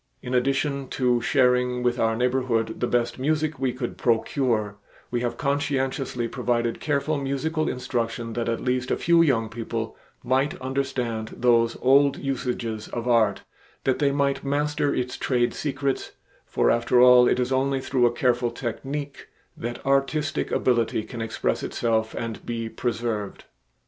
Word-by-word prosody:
In 125 - -4
addition 135 +2 0
to 125 -2 +1
sharing 125 -1 +2
with 125 0 +1
our 115 0 +2
neighborhood 125 -2 0
the 120 - 0
best 120 +1 0
music 155 +1 0
we 130 -1 +1
could 125 -1 -5
procure, 115 -3 0 0.3
we 120 -1 -1
have 120 -1 -2
conscientiously 135 -2 -1
provided 120 -1 -1
careful 145 0 0
musical 155 +4 -1
instruction 115 -2 -3
that 120 0 -2
at 115 - -2
least 125 0 0
a - - +1
few 170 0 +4
young 125 -8 +2
people 115 0 -4 0.3
might 130 +3 +1
understand 130 -4 -3
those 115 -1 +3
old 140 +2 +5
usages 125 -5 -3
of 120 +1 -5
art; 110 -5 +3 0.4
that 130 - +1
they 140 -2 +3
might 140 0 0
master 145 +1 0
its 125 -1 -2
trade 120 -2 +1
secrets, 140 -2 -2 0.3
for - - +2
after 120 +1 +2
all 125 0 +8
it - - +2
is 125 +1 0
only 135 +1 +1
through 130 -2 +2
a - - +1
careful 120 0 +1
technique 135 +4 -5 0.3
that 120 +1 -6
artistic 140 +2 +1
ability 120 -3 +1
can 115 +1 -7
express 110 - -1
itself 110 -2 -1
and 115 -2 -5
be 115 -1 -3
preserved. 115 -3 -3
125 Hz, 150 wpm, -25 LUFS, 115-135 Hz, 0.4 s, all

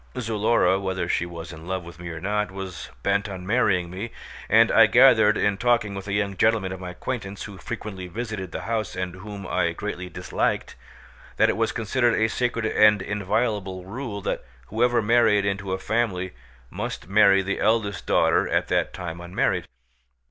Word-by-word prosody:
Zulora, 110 -4 +2
whether 95 -1 -2
she 85 - 0
was 85 0 -8
in 80 +2 -11
love 95 -1 -2
with 85 0 -12
me 90 -1 -6
or 80 -1 -6
not, 105 +3 -1
was 95 -2 -7
bent 100 +1 +1
on 95 -2 -7
marrying 95 -6 +1
me, 100 +6 -5 0.4
and - - +5
I - - +7
gathered 115 -4 +6
in 100 -1 +1
talking 120 -4 +2
with 100 0 -7
a 100 - -3
young 100 -1 0
gentleman 110 -3 +2
of 95 - -6
my 90 -1 -6
acquaintance 100 +1 -5
who 100 -3 -9
frequently 105 -5 -6
visited 105 -2 -5
the - - -5
house 110 -3 -2
and 90 -1 -3
whom 100 0 -8
I 85 -2 0
greatly 90 -1 -5
disliked, - - -2 0.6
that - - +4
it - - +1
was 115 0 0
considered 120 +1 +1
a 110 0 +2
sacred 120 -1 -1
and 105 -1 +5
inviolable 100 -1 -2
rule 105 0 -5
that - - -3 0.3
whoever 120 +1 +2
married 105 -2 +4
into 100 -1 -2
a 95 - 0
family 95 -3 -1 0.4
must - - -5
marry 100 -1 +5
the 100 +1 -2
eldest 110 -2 0
daughter - - +3
at - - 0
that - - 0
time 85 -2 -6
unmarried. 85 +1 -1
100 Hz, 180 wpm, -24 LUFS, 95-110 Hz, 0.6 s, I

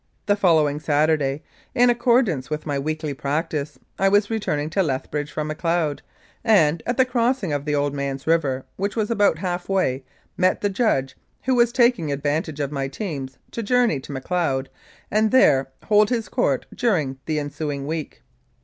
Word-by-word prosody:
The 205 - +3
following 160 -7 +3
Saturday, 150 -1 +1 0.3
in 245 -1 +5
accordance 235 - +2
with 150 0 -4
my 145 -2 -1
weekly 155 +1 -3
practice, 150 0 -3 0.2
I 195 - +4
was 205 +2 +2
returning 155 -9 -1
to 195 - +2
Lethbridge 145 -1 -2
from 155 - -3
Macleod, 160 -1 -1 0.4
and 165 -8 +4
at 240 0 -1
the 260 - +5
crossing 240 - 0
of 145 0 -2
the 150 -1 0
Old 145 0 0
Man's 140 -1 -4
River, 145 -5 +1
which 200 +2 -2
was 220 -1 -1
about 205 -7 +3
half 175 +1 -3
way, 140 -9 0 0.3
met 185 0 +2
the 205 - 0
judge, 190 - 0 0.3
who 260 - +1
was 240 -1 +4
taking 235 - +2
ad 140 0 -4
vantage 150 0 -1
of 140 -1 -2
my 135 -2 -2
teams 135 - -5
to 230 - -4
journey 240 - +2
to 130 - -10
Macleod 135 -1 -1 0.4
and 215 +1 +3
there 135 - +4 0.2
hold 210 0 +4
his 235 -3 -1
court - - 0
during 155 - 0
the 155 -1 0
ensuing 145 -1 -3
week. 155 0 -5
155 Hz, 175 wpm, -23 LUFS, 145-205 Hz, 0.4 s, in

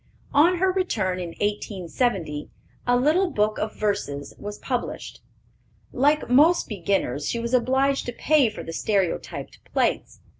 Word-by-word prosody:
On 335 +6 +5
her 375 +2 +2
return, 210 - -1
in 170 -2 -6
1870, 195 - -2 0.4
a 245 - +4
little 320 +9 +3
book 215 -5 0
of 215 - -3
Verses 200 -9 -2
was 205 0 -6
published. 250 -2 -4 0.7
Like 290 +3 +2
most 300 +8 +5
beginners, 180 - -1
she - - -1
was 235 +1 -3
obliged 265 +2 +2
to - - -1
pay 285 0 +3
for 215 - -8
the 165 - -7
stereotyped 195 -2 -2
plates. - - 0
230 Hz, 140 wpm, -24 LUFS, 195-275 Hz, 0.7 s, On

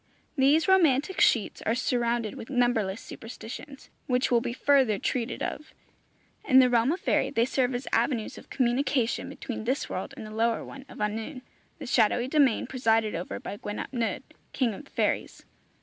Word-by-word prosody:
These 290 +5 +4
romantic 340 -2 +3
sheets 225 -4 +3
are 225 - 0
surrounded 235 -3 0
with 225 - -9
numberless 240 -6 +1
superstitions, 245 +4 -10 0.2
which 250 0 +1
will 235 -1 +4
be 240 0 -3
further 260 -4 +3
treated 240 +3 -2
of. 305 - -5 0.7
In 260 - +4
the 255 -1 +7
realm 240 +3 +3
of 355 - -2
faerie - - +1
they 230 - +2
serve 255 -1 0
as 245 - -5
avenues 235 -1 0
of - - -13
communication 255 -1 0
between 225 -3 -6
this 260 +4 -1
world 190 +9 -5
and 225 - -7
the 215 - -9
lower 230 +1 0
one 270 -1 -10
of - - -12
annwn, 220 +6 -3 0.4
the - - -8
shadowy 240 0 +2
domain 275 -5 +3
presided 225 -4 +1
over 170 +2 -4
by 205 - -7
Gwyn 205 0 -6
ap - - -6
Nudd, 235 -3 -2 0.3
king 245 -5 +1
of 195 - -10
the - - -20
fairies. - - -2
245 Hz, 180 wpm, -27 LUFS, 225-265 Hz, 0.7 s, the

